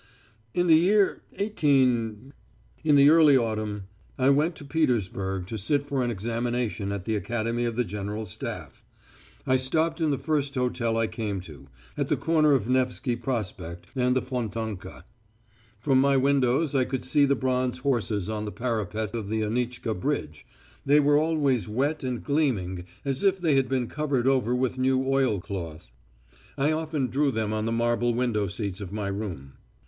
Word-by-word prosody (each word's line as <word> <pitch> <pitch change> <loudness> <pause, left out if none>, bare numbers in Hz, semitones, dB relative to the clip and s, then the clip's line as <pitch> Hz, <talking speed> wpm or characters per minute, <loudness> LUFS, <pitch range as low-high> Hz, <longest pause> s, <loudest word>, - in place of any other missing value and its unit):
"In 175 - +2
the 165 - +6
year 195 +5 +3
18, 130 - +1 0.5
in 150 -2 +4
the 140 +1 +7
early 155 -4 +7
autumn, 110 -3 -2 0.3
I 130 +1 +4
went 155 +4 +2
to 145 - -10
Petersburg 100 - -1
to 110 +3 -5
sit 140 +8 +1
for 140 -2 -2
an 120 - 0
examination 115 -1 -2
at 100 -2 -4
the 110 - 0
Academy 115 +2 -1
of 115 -1 -2
the 125 - +1
General 105 +1 -4
Staff. 90 - -7 0.6
I 130 -1 +3
stopped 160 +6 0
in 160 - +2
the 140 - +1
first 145 0 -1
hotel 120 -2 0
I 115 - +2
came 110 -2 -3
to, 75 -6 -13 0.3
at - - -1
the - - +1
corner 155 -2 +3
of 125 -5 +1
Nevsky 125 0 0
Prospect 105 -8 -4
and 125 -1 +2
the 130 - +1
Fontanka. 115 -5 -5 0.7
From 130 +3 +3
my 140 0 +3
windows 135 +2 +2
I 135 -2 +3
could 130 0 -3
see 145 +2 +3
the 140 0 +2
bronze 130 -1 0
horses 115 -7 -1
on 110 -1 -3
the 105 - -4
parapet 110 -3 -3
of 110 -4 -4
the 110 0 -1
Anitchka 120 +1 -2
Bridge 90 - -3 0.4
they 145 +2 +5
were 145 0 +4
always 145 - +1
wet 140 +7 -1
and 125 -2 -3
gleaming 105 - 0 0.2
as 135 -1 -1
if 195 -1 +3
they 170 -5 +1
had 135 -2 +2
been 130 -2 0
covered 140 -2 -1
over 125 -3 +2
with 130 0 -1
new 130 0 +2
oilcloth. 100 - -2 0.7
I 145 +2 +2
often 155 -3 -1
drew 140 +3 +1
them 110 -4 -1
on 110 0 -1
the - - -1
marble 120 +1 +1
window 115 -5 0
seats 100 0 -4
of 95 -2 -6
my 105 -1 -3
room. 90 -10 -5
125 Hz, 175 wpm, -26 LUFS, 110-140 Hz, 0.7 s, the